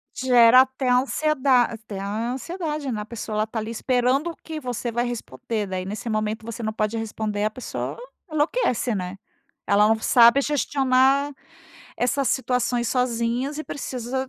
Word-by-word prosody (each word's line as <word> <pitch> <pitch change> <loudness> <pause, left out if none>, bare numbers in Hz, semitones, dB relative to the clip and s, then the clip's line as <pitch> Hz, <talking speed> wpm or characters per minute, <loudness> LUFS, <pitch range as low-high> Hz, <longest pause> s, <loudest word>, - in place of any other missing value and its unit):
Gera 250 -1 +6
até 260 0 -1
ansieda 265 0 +3
até 220 -4 -6
ansiedade, 265 - -3
né? 215 -3 -3
A - - -6
pessoa, 220 -1 -6
ela 215 +1 +1
tá 220 0 -4
ali 220 +1 -5
esperando 255 +7 0
que 320 -1 -6
você 245 -3 -4
vai 240 +1 0
responder 220 - -4
né? 190 0 -4
Aí, 185 - -4
nesse 210 +4 -5
momento 215 0 -2
você 230 0 -6
não 220 0 -2
pode 215 +1 -1
responder, 215 -2 -3
a 215 - 0
pessoa 255 +3 -5 0.3
enlouquece, 295 - 0
né? 180 0 -4 0.5
Ela 205 +1 +5
não 220 0 +2
sabe 235 +4 +6
gestionar 275 -1 +2 0.7
essas 265 +2 +1
situações 250 -2 0
sozinhas 250 +3 -1
e 310 - -4
precisa 260 -1 -4
245 Hz, 155 wpm, -24 LUFS, 220-265 Hz, 0.7 s, Gera